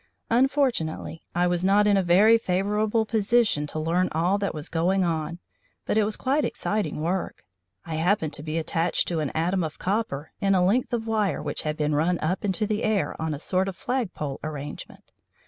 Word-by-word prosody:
Unfortunately 245 - +1
I 175 0 +3
was 175 0 +1
not 200 +2 +4
in 205 -1 +4
a 195 - +3
very 200 +6 +5
favourable 210 +3 0
position 215 -7 +2
to 150 - -7
learn 170 +4 +1
all 175 +6 +1
that 200 - -1
was 155 +2 -5
going 185 +4 +1
on, 165 -1 -2 0.5
but - - 0
it 215 -1 +3
was 215 - -2
quite 280 +3 +1
exciting 210 -7 -2
work. 180 +3 -2 0.4
I 160 -2 -4
happened 165 -2 +1
to - - -6
be 155 +1 -3
attached 165 +1 0
to 170 -2 -1
an 150 -3 -1
atom 175 +3 +1
of 155 -1 -5
copper 185 -7 -2
in 195 -1 +3
a 180 -1 +3
length 240 +6 +1
of 235 -2 -1
wire 215 -3 0
which - - -3
had 155 0 -3
been 150 0 0
run 165 +4 +2
up 175 +5 -2
into 205 +2 0
the 210 +1 -1
air 215 -3 0
on 160 -1 -1
a - - -8
sort 185 +4 0
of 195 - -4
flag 245 -6 -2
pole 140 -3 -4
arrangement. 145 -1 -7
185 Hz, 200 wpm, -25 LUFS, 160-210 Hz, 0.5 s, very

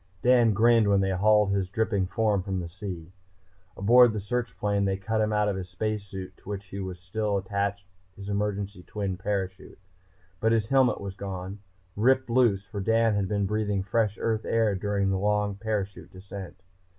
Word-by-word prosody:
Dan 120 -3 +5
grinned 115 +1 +4
when 100 -1 +4
they 95 0 +1
hauled 105 +1 +4
his 95 -2 0
dripping 100 -2 0
form 105 0 +1
from 95 0 -3
the 85 - -4
sea. 90 -1 -7 0.7
Aboard 120 +3 +6
the 105 - -2
search 110 0 -3
plane 100 +1 0
they 95 -1 0
cut 110 +3 -1
him 110 0 +1
out 105 0 +2
of 100 - 0
the 95 - -3
space 105 +3 -3
suit 95 -1 -8
to - - -14
which 100 -1 -6
was 95 -2 -5
still 100 +2 -1
attached 100 0 -2 0.3
his 100 0 -9
emergency 100 -1 -2
twin 100 0 -4
parachute. 95 0 -4 0.6
But 110 +1 +2
his 110 -1 0
helmet 130 -2 +3
was 100 -1 -6
gone, 95 0 -6 0.4
ripped 130 +3 +2
loose, 115 -6 +3
for 100 -1 -6
Dan 115 +2 +3
had 100 -2 0
been 100 0 0
breathing 105 -1 -1
fresh 105 +1 0
Earth 110 -1 0
air 115 -2 +1
during 100 0 0
the 95 - 0
long 105 0 +1
parachute 100 -1 -4
descent. 95 0 -9
100 Hz, 185 wpm, -27 LUFS, 95-110 Hz, 0.7 s, Aboard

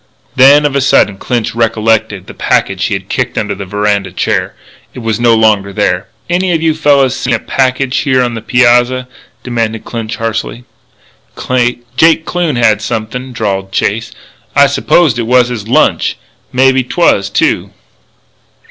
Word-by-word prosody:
Then, 140 +3 +6
of 140 -1 0
a 140 - +2
sudden, 105 -7 +2
Clinch 120 -3 -2
recollected 110 -4 0
the - - -11
packet - - 0
which - - -1
he - - -1
had - - -7
kicked - - -3
under - - -1
a 100 - -7
veranda 105 -1 -1
chair. 90 - -2 0.4
It - - -10
was 115 -1 -2
no 120 -1 +4
longer 105 -3 +2
there. 95 -2 -1 0.2
"Any 180 +1 0
o' - - +2
you 160 0 +1
fellas 140 -4 +2
seen 125 -2 -1
a - - -3
package 130 +1 -1
here 130 -3 +1
on 120 -1 -2
the 115 - -6
pyazza?" 125 +2 +2 0.4
demanded 115 -3 -3
Clinch 115 -2 -5
harshly. 115 +2 -4 1.3
"Jake 160 +3 +3
Kloon, 175 -5 -1
he 120 - -1
had 110 -2 +3
somethin'," 115 +5 -4
drawled 100 -5 -3
Chase. 110 +4 -1 0.4
"I 140 - +6
supposed 140 -1 +2
it 115 - -2
was 125 0 +3
his 110 -4 -6
lunch. 120 - +1 0.3
Mebbe 130 +1 +3
'twas, 100 - +1
too." - - 0
120 Hz, 165 wpm, -12 LUFS, 110-130 Hz, 1.3 s, Then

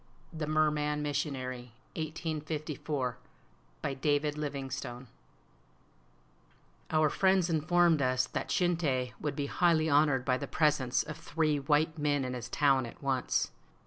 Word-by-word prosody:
THE 155 -2 -3
MERMAN 150 -1 +1
MISSIONARY 130 -4 -3 0.2
I1854I 155 -4 -3 0.7
BY - - -1
DAVID 145 +2 0
LIVINGSTONE 135 -4 -5 1.8
Our 155 -1 +3
friends 190 -2 +3
informed 165 0 +3
us 130 -1 +2
that - - -4
Shinte 155 -9 +1
would 150 - -2
be 145 - -2
highly 160 0 +2
honored 145 -3 +3
by 130 -1 +2
the 140 - -4
presence 145 -5 +2
of 155 -1 -7
three 160 -2 0
white 155 +3 +1
men 145 -2 +1
in 125 - -3
his 125 -1 -6
town 135 -3 +3
at 115 - -13
once. 135 -2 0
150 Hz, 125 wpm, -31 LUFS, 130-155 Hz, 1.8 s, Our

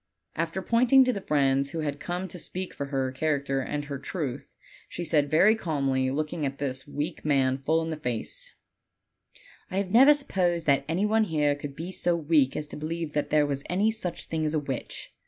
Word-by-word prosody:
After 165 +3 -2
pointing 250 +4 +5
to 255 - +2
the 200 - -4
friends 140 -4 +2
who 160 +2 -4
had 145 -1 -3
come 180 +2 -3
to 180 - -6
speak 185 +2 -5
for 140 - -4
her 135 -2 -1
character 140 -1 0
and 145 +2 -3
her 140 -2 -5
truth, 140 -3 -5 0.3
she 175 - -5
said 150 -3 +2
very 190 +9 +5
calmly, 135 -9 0
looking 150 +3 -2
at 140 -1 -2
this 135 -1 -3
weak 150 +3 -4
man 135 -3 +2
full 160 +4 +1
in 160 - -3
the 160 - -3
face: 125 -6 -4 1.1
"1 190 0 -2
never 270 +7 +8
supposed 180 - 0
that 140 -1 +3
any 180 +5 +1
one 220 +1 +3
here 150 -5 +1
could 145 -1 -7
be 170 +5 -5
so 175 -2 +1
weak 150 -4 +2
as 150 - -2
to - - -8
believe 160 +1 -4
that 150 - -1
there 150 -1 +4
was 140 -1 -2
any 200 +5 +2
such 185 -6 -4
thing 160 -1 -3
as 155 0 0
a - - +2
witch. 135 -4 -5
155 Hz, 205 wpm, -27 LUFS, 140-175 Hz, 1.1 s, never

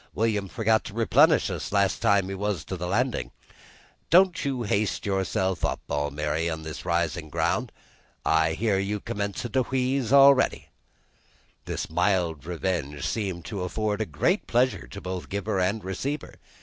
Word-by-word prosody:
William 105 -3 0
forgot 110 +1 +1
to 100 - -8
replenish 115 -1 +4
us - - -4
last 100 -1 +1
time 100 -4 +3
he 95 - -4
was 95 -4 -2
to 95 - -4
the 90 0 -4
Landin'. 115 - 0 0.8
Don't 185 +1 +5
you 135 -4 -1
haste 100 -1 0
so 100 - -1
yourself 95 -1 -1
Almiry, 75 +3 -1
up 80 -1 -4
this 80 -1 -7
risin' 85 -2 -1
ground. - - 0 0.5
I 80 0 +3
hear 100 +1 +1
you 100 +2 -2
commencin' 100 +3 -4
to 130 - +2
wheeze 130 -1 -1
a'ready." 140 -1 +5 1.0
This - - -3
mild 85 -3 0
revenge 85 -6 -2
seemed 95 -6 -3
to 100 -4 -5
afford 105 +1 -2
great 175 - +1
pleasure 125 +2 +1
to 100 - -8
both 90 -1 -5
giver 100 0 -2
and 100 +4 0
receiver. 130 - -4
100 Hz, 150 wpm, -26 LUFS, 85-115 Hz, 1.0 s, Don't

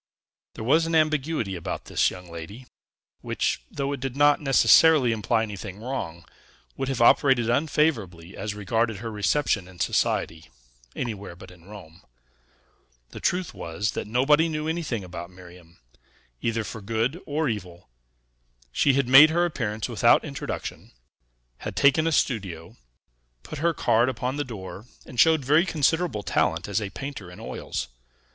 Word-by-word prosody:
There - - -6
was 160 +8 +3
an 165 - -1
ambiguity 155 -9 +1
about 85 - -5
this - - +2
young 90 -1 -10
lady, 85 +9 -9 0.6
which, - - -1
though 140 0 -3
it 140 - -5
did 135 0 -4
not 145 +1 +4
necessarily 135 +1 +5
imply 110 +1 0
anything 100 -2 -7
wrong, 95 -9 -5 0.5
would 135 - -3
have 130 -3 0
operated 120 -2 +4
unfavorably 120 - 0
as 105 -1 -4
regarded 110 +2 -1
her 115 +3 -6
reception 105 -1 0
in 90 -1 -15
society, 80 -1 -1 0.5
anywhere 105 -7 -5
but 95 +1 -13
in 85 -2 -18
Rome. 95 -4 -13 1.1
The - - -8
truth 180 -1 -1
was, 100 +6 -3
that - - -5
nobody 145 +8 +3
knew 155 0 -3
anything 160 - -2
about 85 -1 -8
Miriam, 90 -2 -16 0.6
either 115 -1 -1
for 110 +1 -7
good 115 - -2
or 150 +1 -1
evil. 90 -7 -5 0.8
She 140 - +3
had 135 -2 +1
made 135 +4 +9
her 175 +2 +2
appearance 110 -10 -3
without - - +3
introduction, - - -6 0.7
had - - -6
taken 155 +3 +4
a - - +1
studio, 95 - -1 0.7
put 155 - -8
her 170 +2 +2
card 120 0 +2
upon 130 +2 -3
the 145 - -1
door, 110 -3 -9 0.2
and 125 - -8
showed 160 -4 +4
very 155 +5 +4
considerable 160 - 0
talent 85 -1 0
as 100 +1 -1
a 100 - -4
painter 130 -4 -7
in 90 - -12
oils. - - -5
115 Hz, 150 wpm, -25 LUFS, 95-145 Hz, 1.1 s, made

